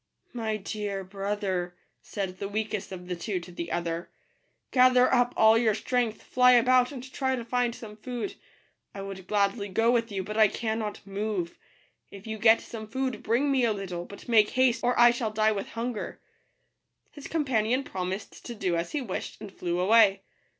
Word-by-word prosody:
" - - -51
My 220 -3 -2
dear 200 -1 -4
brother," 195 -2 -3 0.3
said 190 -2 -5
the 200 - -4
weakest 210 -2 -3
of 180 -1 -8
the 180 - -2
two 185 +2 -3
to 175 +1 -11
the 170 -1 -6
other, 170 0 -3 0.3
" - - -46
gather 255 0 +5
up 245 -1 +3
all 220 0 +6
your 220 -3 +2
strength, 230 0 -1
fly 250 0 +5
about, 250 +1 +4
and 260 -3 -7
try 265 -1 0
to 240 -2 -5
find 245 0 0
some 210 -2 -10
food. 245 0 -5 0.6
I 195 - -5
would 190 -2 -8
gladly 200 0 0
go 225 +5 +2
with 230 -2 +1
you, 195 -2 -2
but 210 +3 -5
I 215 -1 +7
cannot 220 -1 -3
move. 200 -3 -3 0.5
If 200 +1 -12
you 220 -1 -5
get 225 +1 +6
some 220 -2 -8
food, 260 +3 -3
bring 250 +6 +1
me 265 -2 +2
a 230 -2 +3
little; 180 -4 -5
but 200 - -12
make 220 -3 +5
haste, 255 -2 +2
or 245 0 +1
I 240 0 +8
shall 235 -2 -2
die 215 0 +2
with 200 -2 -3
hunger." 235 -1 -4 0.9
His 290 - -10
companion 260 -5 +1
promised 190 -3 -5
to 240 - -6
do 185 -5 -1
as 170 0 -3
he 300 - -1
wished, 210 -8 -5
and 200 - -9
flew 175 0 -2
away. 200 +1 +5
215 Hz, 190 wpm, -27 LUFS, 195-240 Hz, 0.9 s, I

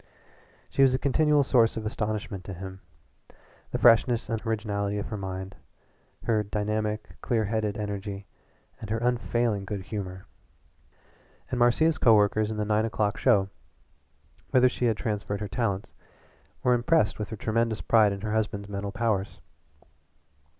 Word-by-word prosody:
She - - +1
was 130 -1 +5
a - - +2
continual 145 +2 +3
source 120 -4 +3
of 110 - -4
astonishment 105 -3 -3
to 95 - -6
him 95 +1 -8 0.9
the - - -2
freshness 115 0 +4
and 110 -1 -2
originality 105 -2 -1
of 105 - -4
her 105 - -4
mind, 95 -1 -5 0.7
her 110 -2 +2
dynamic, 105 +1 -2
clear 115 -4 0
headed 105 0 -1
energy, 100 -1 -5 0.5
and 110 - -8
her 110 - 0
unfailing 120 -3 0
good 100 0 -5
humor. 95 -2 -6 1.3
And 125 - -1
Marcia's 140 +6 +3
co 115 -2 +6
workers 105 +1 +2
in 110 - -4
the 105 - -1
nine 105 +1 +2
o'clock 105 -2 0
show, 100 -7 +3 1.0
whither 130 0 +5
she 125 - -2
had 115 -3 +2
transferred 105 -3 -3
her 105 - -3
talents, 100 -2 -2 0.7
were 125 - +4
impressed 120 -4 +2
with 105 - -4
her 110 - -6
tremendous 115 +1 0
pride 110 -3 +4
in 100 0 -5
her 105 0 -2
husband's 105 -2 -1
mental 100 0 -4
powers. 105 -2 -1
110 Hz, 150 wpm, -27 LUFS, 100-115 Hz, 1.3 s, co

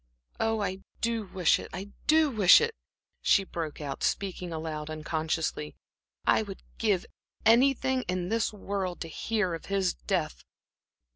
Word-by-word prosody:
"Oh, 225 -1 +1
I 190 -1 -2 0.2
do 230 -2 -1
wish 180 -2 +3
it, - - -8
I 195 +2 -7 0.2
do 310 -1 +5
wish 205 -6 +8
it!" 465 0 0 0.5
she 195 - +4
broke 165 -5 -5
out, 140 -3 -5
speaking 185 -3 -1
aloud, 155 -1 -4
unconsciously. 155 0 -2 0.5
"I - - +4
would 200 -3 -8 0.2
give 205 -5 +2 0.4
anything 260 +2 +4
in 180 0 -1
this 225 0 +1
world 195 -3 -3
to 165 - -3
hear 210 +2 -1
of 165 - -6
his 195 -3 +1
death." - - -2
190 Hz, 145 wpm, -29 LUFS, 165-225 Hz, 0.5 s, wish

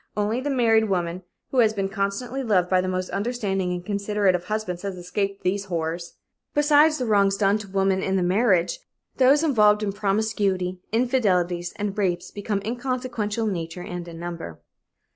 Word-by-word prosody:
Only 210 +4 0
the 290 - -2
married 225 -5 +3
woman 175 -1 -1 0.3
who 260 - +1
has 220 -2 +4
been 195 -2 -1
constantly 200 +7 -2
loved 195 -7 +1
by 185 -1 +4
the 185 - -3
most 185 0 -2
understanding 195 -4 -1
and 180 0 -4
considerate 200 -1 +1
of 180 0 -2
husbands 200 -4 -3
has 195 -2 -4
escaped 195 +3 -3
these 195 +2 0
horrors. 170 -1 -3 0.4
Besides 295 +1 +5
the 255 - -2
wrongs 200 -3 +3
done 205 +1 +2
to 210 - -8
women 190 0 +1
in 190 -2 0
marriage, 190 - +2 0.4
those 270 +4 +5
involved 210 -8 +4
in 205 - 0
promiscuity, 195 -3 0
infidelities 185 -8 +1
and 205 -1 -3
rapes 180 -4 -1
become 205 -1 -3
inconsequential 240 -3 -2
in 210 - 0
nature 165 0 -5
and 175 -1 -6
in 165 -1 -9
number. 170 - -6
200 Hz, 170 wpm, -24 LUFS, 180-220 Hz, 0.4 s, Besides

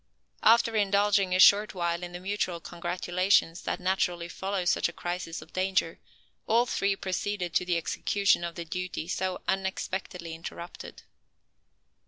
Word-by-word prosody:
After 230 0 +5
indulging 200 -2 +3
a - - +2
short 205 +2 +6
while 170 -1 -1
in 175 0 -6
the 175 - -7
mutual 185 -2 -2
congratulations 175 +1 0
that - - -2
naturally 180 -2 0
follow 190 +1 -3
such 175 - +2
a - - -10
crisis 175 -2 -4
of 160 - -21
danger, 185 -3 0 0.5
all 235 +2 +4
three 200 -4 0
proceeded 185 -1 -3
to - - +2
the 175 -1 +1
execution 200 +2 +1
of 170 -1 -4
the 170 - -5
duty 180 -1 -4
so 185 0 -2
unexpectedly 190 -2 -3
interrupted. 170 +1 -9
185 Hz, 145 wpm, -28 LUFS, 175-195 Hz, 0.5 s, short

